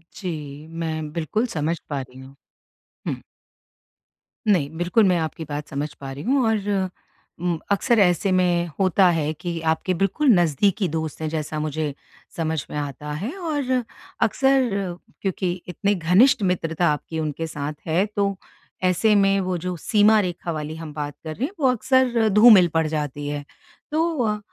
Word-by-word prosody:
जी। 150 -5 -6
मैं 155 -2 -3
बिल्कुल 170 +8 -1
समझ 160 +3 0
पा 140 -2 -2
रही 130 0 -12
हूँ। 135 +1 -13 0.7
हुँ। - - -2 1.3
नहीं। 175 -9 +3
बिल्कुल 175 +6 +3
मैं 180 -1 +3
आपकी 160 +1 -3
बात 145 0 -5
समझ 145 +1 -4
पा 135 -1 -8
रही 135 +2 -7
हूँ 265 +1 +2
और 205 -3 0 0.5
उम, 175 -1 -1
अक्सर 225 +3 +3
ऐसे 190 +1 +3
में 175 -2 +2
होता 190 0 +4
है 155 -1 0
कि 170 +2 -5
आपके 180 +3 -1
बिल्कुल 195 - 0
नज़दीकी 175 +4 +2
दोस्त 160 0 -4
है 160 - -1
जैसा 155 -1 -3
मुझे 150 -1 -2 0.4
समझ 160 -2 -1
में - - -5
आता 145 0 -5
है। 190 - -3
और 285 -7 0 0.4
अक्सर 265 +2 +3 0.5
क्योंकि 190 -2 -1 0.2
इतने 200 +4 0
घनिष्ठ 185 +9 +4
मित्रता 170 -2 +1
आपकी 160 +2 -5
उनके 155 +1 -3
साथ 150 -1 -4
है 175 +5 +2
तो 200 -1 +1 0.5
ऐसे 185 +4 +3
में 195 -1 +4
वो 185 -1 -1
जो 180 +1 -4
सीमा 215 +5 +4
रेखा 175 -3 -2
वाली 155 0 -4
हम 160 -2 -8
बात 145 -1 -4
कर 155 -1 -5
रहे 245 - -1
हैं 310 - -5
वो 275 - +3
अक्सर 250 -2 +2
धूमिल 210 -4 +8
पड़ 160 0 +2
जाती 145 -2 -3
है। 145 0 -3 0.5
तो 320 -3 +1
अ, 210 -1 0
175 Hz, 165 wpm, -23 LUFS, 155-205 Hz, 1.3 s, धूमिल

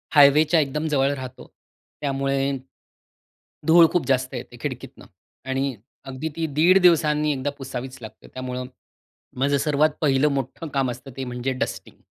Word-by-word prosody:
हायवेच्या 150 +3 +6
एकदम 150 +2 -1
जवळ 140 -2 +2
राहतो. 130 -2 -9 0.5
त्यामुळे, 135 0 0 1.2
धूळ 165 +1 +8
खूप 175 - 0
जास्त 130 -1 +1
येते - - -8
खिडकीतनं - - -6 0.4
आणि 135 0 -1 0.3
अगदी 135 +4 -4
ती 165 0 -1
1.5 175 +5 +6
दिवसांनी 150 -3 +4
एकदा 135 +1 -2
पुसावीच 130 -1 -6
लागते. 110 -1 -11
त्यामुळं 125 0 -5 0.7
माझं 140 +2 +2
सर्वात 150 +2 +2
पहिलं 140 -1 +3
मोठं 135 +4 -4
काम 135 -2 +1
असतं 125 +3 -10
ते 135 - -3
म्हणजे 125 +1 -3
डस्टिंग. 130 - -5
135 Hz, 140 wpm, -23 LUFS, 130-150 Hz, 1.2 s, धूळ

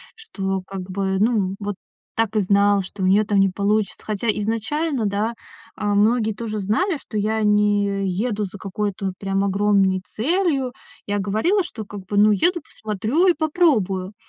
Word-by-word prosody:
что 195 - -3
как 195 -1 -5
бы, 190 0 -1
ну, 205 -3 +1
"вот 205 0 -3 0.4
так 225 -1 0
и - - +4
знал", 200 0 +3
что 190 +1 -7
у - - +2
неё 200 +3 +4
там 205 -1 +2
не 195 0 +4
получится. 200 +1 0
Хотя 215 +2 -3
изначально, 225 +6 -1
да, 210 +3 -1 0.4
а, 205 -1 -1
многие 220 +1 +3
тоже 215 0 -4
знали, 310 - 0
что 220 - -7
я 215 +2 0
не 205 -1 +2
еду 210 +2 -1
за 195 +1 -9
какой-то 200 +1 -3
вот 190 - -3
прям 195 0 0
огромной 195 -1 +2
целью. 275 - 0 0.4
Я 205 0 0
говорила, 220 - +1
что 225 -11 -7
как 205 0 -8
бы, 205 +2 -3
"ну, 210 +1 +6
еду 345 - +2
посмотрю 225 - -1
и 360 - +6
попробую". 250 - +1
210 Hz, 170 wpm, -22 LUFS, 195-225 Hz, 0.4 s, ну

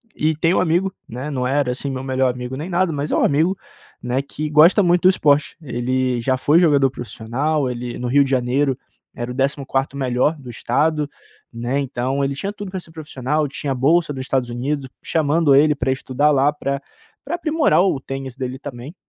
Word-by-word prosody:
e 155 +1 +1
tem 165 +2 +2
amigo, 185 +2 +1 0.2
né, 130 +6 -5
não 125 -2 -1
era 135 -1 +1
assim 130 +3 -4
meu 130 -1 -4
melhor 130 -1 +1
amigo 125 +1 -6
nem 155 +6 -5
nada, 175 -2 +1
mas 145 +1 -3
é - - +2
um - - +2
amigo, 165 +7 +2 0.5
né, 125 +2 0
que 150 +2 -5
gosta 165 +7 +6
muito 175 0 +3
do 185 - +7
esporte. 145 -5 +2
Ele 125 -2 -1
já 130 +2 +1
foi 150 +5 +4
jogador 140 -6 +4
profissional, 135 +5 -2
ele 120 0 -5
no 125 - -3
Rio 140 +3 +4
de 135 - -4
Janeiro 130 +1 +1 0.4
era 120 0 -4
o - - -5
14° 135 0 -1
melhor 130 +4 +1
do 130 -3 -11
estado, 150 +6 0 0.4
né, 120 +4 -2
então 135 +1 -1
ele 135 0 -1
tinha 200 +7 -4
tudo 205 -2 -7
pra 185 0 -4
ser 165 - -14
profissional, 150 -1 -2
tinha 140 0 -3
bolsa 150 +5 +2
do 130 - -5
Estados 130 -2 -1
Unidos, 135 +3 -2 0.2
chamando 155 -2 +2
ele 150 +2 +5
pra 130 -2 -1
estudar 135 +3 +1
lá 140 +1 +3
pra 140 -2 -3 0.5
pra 315 +5 -2
aprimorar 310 - +2
o 185 -8 +1
tênis 135 -1 -6
dele 130 0 -4
também. 140 +2 -8
140 Hz, 200 wpm, -20 LUFS, 130-155 Hz, 0.5 s, do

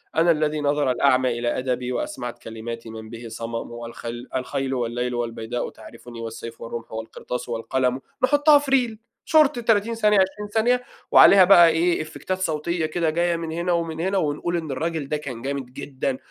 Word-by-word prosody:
"أنا 165 +2 +4
الذي 155 -1 0
نَظَرَ 145 -2 +1
الأعمى 130 -2 +2
إلى 120 0 -1
أدبي، 125 -1 -2
وأسمعت 120 0 -4
كلماتي 115 +1 -7
من 110 0 -9
بِه 115 +1 -8
صمم، 115 +1 -5
والخل 120 +1 -7
الخيل 135 +1 -2
والليل 120 0 -2
والبيداء 120 0 -3
تعرفني، 120 -1 -12
والسيف 115 0 -7
والرمح 115 0 -7
والقرطاس 115 +2 -6
والقلم." 125 +2 -1 0.2
نُحطّها 290 +2 +6
في 285 -1 -5
ريل 240 -5 +2 0.3
شرط 300 -5 +4
30 225 -1 +2
ثانية، 210 -2 +3
20 195 +2 0
ثانية، 245 +3 +2 0.3
وعليها 195 -1 +8
بقى 175 -3 +8
إيه 170 +1 +1
إفّكتات 185 +4 -4
صوتية 165 -1 -1
كده 160 +1 0
جاية 170 +2 +1
من 165 -1 -4
هنا 170 +2 -1
ومن 165 -2 -1
هنا، 190 +3 0
ونقول 170 +1 -1
إن 160 -4 -4
الراجل 160 +2 -2
ده 150 - 0
كان 130 -6 -7
جامد 140 +1 -3
جدًا، 135 -1 -3
145 Hz, 170 wpm, -23 LUFS, 120-175 Hz, 0.3 s, وعليها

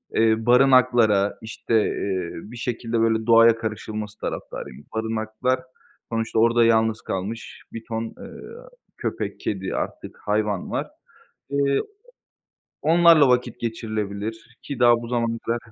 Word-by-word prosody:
eee, 110 0 +2
barınaklara, 120 -5 +4
işte, 115 0 -3
eee, 95 -3 -2 0.2
bir 120 - -9
şekilde 115 -1 -2
böyle 110 -1 +1
doğaya 115 0 +7
karışılması 110 -1 -5
taraftarıyım. 65 +3 -6
Barınaklar 110 +3 -1 0.5
sonuçta 115 -1 -1
orada 115 0 +4
yalnız 110 -1 +2
kalmış 105 +5 -5
bir 115 0 -7
ton, 115 -1 -3
eee, 115 - -10 0.6
köpek, - - -4
kedi, 95 -2 -3
artık - - -5
hayvan 105 -2 -1
var. - - -2 0.6
Eee, 140 -1 +1 0.8
o 160 - -4
onlarla 165 -4 +7
vakit 125 -1 +1
geçirilebilir 110 0 -4
ki 140 -4 -6
daha 120 -1 +5
bu 115 - -7
zamana 115 -1 -1
kadar 120 +1 0
115 Hz, 125 wpm, -23 LUFS, 110-120 Hz, 0.8 s, doğaya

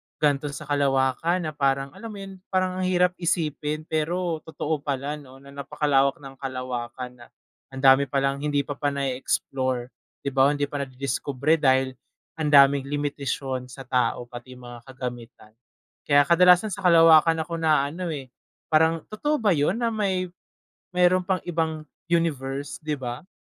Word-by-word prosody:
ganito 145 -1 +1
sa - - -7
kalawakan 140 +4 +1
na 155 - -3
parang 135 -2 0
alam 230 - -9
mo 215 - -8
'yon? 195 -1 -9
Parang 185 -1 0
ang 185 - 0
hirap 180 0 +3
isipin 155 -3 -1
pero 165 +1 -1
totoo 155 -1 -2
pala 140 +1 -3
'no, 135 -2 -15
na 140 - -13
napakalawak 140 0 0
ng 135 -1 -11
kalawakan, 125 -2 -5
na 120 - -12 0.4
ang 135 0 -9
dami 135 +1 +6
palang 135 +1 0
hindi 145 -1 0
pa 145 0 -7
pa 145 -1 -1
nae-explore 130 -1 -2 0.3
'di 140 - -2
ba? 135 0 +4
Hindi 145 0 -2
pa 145 - -3
nadidiskubre 140 +3 -1
dahil 130 -1 +3 0.5
ang 155 - 0
daming 140 -1 +5
limitasyon 140 -3 -3
sa 135 +1 -10
tao, 125 -1 0
pati 120 +1 -11
yung 125 - -15
mga 120 0 -11
kagamitan. 120 -4 -8 0.6
Kaya 145 -1 +6
kadalasan 180 +5 +5
sa 200 - -6
kalawakan 165 -1 +6
ako 165 0 -5
naaano, 155 +2 +1
eh, 135 -4 -8 0.4
parang 160 +1 +3
totoo 295 +8 0
ba 215 -4 +2
'yon 150 +6 +1
na, 235 -1 0
may 190 -4 -1 0.6
meron 180 +1 +4
pang 190 -2 0
ibang 160 -2 -1 0.3
universe, 145 -5 -1
'di 150 -1 -2
ba? 125 +6 -6
145 Hz, 160 wpm, -25 LUFS, 135-165 Hz, 0.6 s, dami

